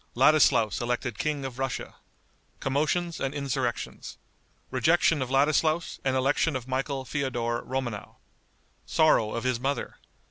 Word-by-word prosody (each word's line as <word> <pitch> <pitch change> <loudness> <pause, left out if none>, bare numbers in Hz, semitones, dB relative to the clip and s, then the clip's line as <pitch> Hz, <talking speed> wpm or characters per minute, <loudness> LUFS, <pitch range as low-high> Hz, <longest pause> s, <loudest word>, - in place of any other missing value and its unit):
Ladislaus 130 -5 +4
Elected 120 -2 -2
King 150 -3 -1
of 130 -1 -6
Russia. 135 -1 -3 0.7
Commotions 155 +5 0
and 135 0 -2
Insurrections. 135 -4 -3 0.5
Rejection 155 +4 +3
of 130 - -2
Ladislaus 155 +4 +2
and 130 -1 +1
Election 135 +4 +2
of 125 -1 -4
Michael 135 +1 -2
Feodor 120 -4 -2
Romanow. 125 -5 -4 0.7
Sorrow 150 -9 +3
of 115 - -3
His 130 -2 0
Mother. 140 +3 -2
135 Hz, 120 wpm, -27 LUFS, 125-145 Hz, 0.7 s, Ladislaus